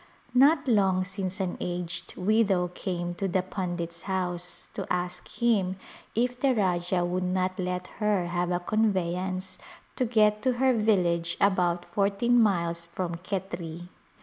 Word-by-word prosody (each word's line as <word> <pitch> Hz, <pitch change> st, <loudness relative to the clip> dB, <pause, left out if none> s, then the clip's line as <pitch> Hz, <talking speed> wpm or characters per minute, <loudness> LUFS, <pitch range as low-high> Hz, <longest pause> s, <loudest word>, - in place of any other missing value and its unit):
Not 285 Hz, +3 st, +5 dB
long 195 Hz, -5 st, +3 dB
since 185 Hz, +1 st, -4 dB
an 185 Hz, -2 st, -2 dB
aged 175 Hz, -1 st, -3 dB
widow 195 Hz, -2 st, +2 dB
came 175 Hz, -1 st, -3 dB
to 195 Hz, +2 st, -2 dB
the 185 Hz, 0 st, +1 dB
pundit's 175 Hz, -3 st, -4 dB
house 180 Hz, -2 st, -3 dB
to -, -, -5 dB
ask 180 Hz, 0 st, -2 dB
him 205 Hz, -6 st, +1 dB, 0.4 s
if 245 Hz, +2 st, 0 dB
the 265 Hz, -1 st, +3 dB
Rajah 180 Hz, -3 st, +1 dB
would 180 Hz, +1 st, -1 dB
not 185 Hz, +1 st, -1 dB
let 180 Hz, 0 st, -2 dB, 0.2 s
her 210 Hz, -4 st, +2 dB
have 175 Hz, 0 st, -1 dB
a 175 Hz, -1 st, +1 dB
convevance 185 Hz, -2 st, -1 dB, 0.4 s
to 255 Hz, -, +2 dB
get 215 Hz, -2 st, +3 dB
to 260 Hz, -1 st, +2 dB
her 260 Hz, +1 st, +3 dB
village 175 Hz, -7 st, +2 dB
about 175 Hz, -3 st, +2 dB
fourteen 205 Hz, +4 st, +2 dB
miles 170 Hz, -5 st, +1 dB
from 170 Hz, 0 st, -3 dB
Khetri. 175 Hz, -2 st, -5 dB
185 Hz, 145 wpm, -28 LUFS, 175-210 Hz, 0.4 s, Not